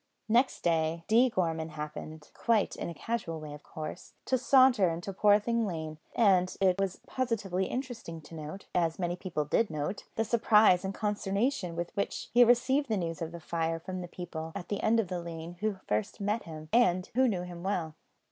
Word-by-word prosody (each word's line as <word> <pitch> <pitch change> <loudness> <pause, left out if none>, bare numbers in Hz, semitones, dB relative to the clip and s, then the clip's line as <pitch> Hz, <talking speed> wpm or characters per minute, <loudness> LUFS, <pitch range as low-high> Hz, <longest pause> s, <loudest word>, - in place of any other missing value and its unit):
Next 240 +4 +2
day, 165 0 +1
D. 235 +4 +5
Gorman 165 -6 -1
happened, 150 0 -7
quite 225 -4 +1
in - - -4
a - - -5
casual 210 -9 -3
way 150 -1 -8
of 145 - -10
course, 155 +4 -8
to 260 - +2
saunter 255 -6 +5
into 175 +4 -4
Poorthing 210 +3 +3
Lane; 160 -3 -5 0.2
and 185 -5 +3
it 190 -1 +3
was 195 -2 -1
positively 205 -7 -1
interesting 245 -10 -5
to 155 - -14
note 155 +4 -7
as 165 -2 +1
many 175 -1 -1
people 170 -4 -3
did 215 +9 +2
note 155 +5 -3
the 225 - +1
surprise 215 -5 +5
and 190 0 -3
consternation 205 -1 -1
with 170 0 -4
which 200 - -2
he 245 +1 +8
received 260 +4 +3
the 215 - +1
news 165 -2 -3
of 165 0 -3
the 170 - -7
fire 165 0 -2
from 185 +2 -5
the 175 - -6
people 165 -2 -6
at - - -6
the 205 - -2
end 225 +1 +3
of 215 - 0
the 180 -1 -3
lane 170 0 -7
who 215 0 0
first 105 +1 -1
met 210 +3 -1
him, 155 -1 -9
and 185 -6 +3
who 260 +2 +4
knew 185 -6 -1
him 175 -1 -8
well. 175 -4 -2
185 Hz, 195 wpm, -30 LUFS, 165-220 Hz, 0.2 s, he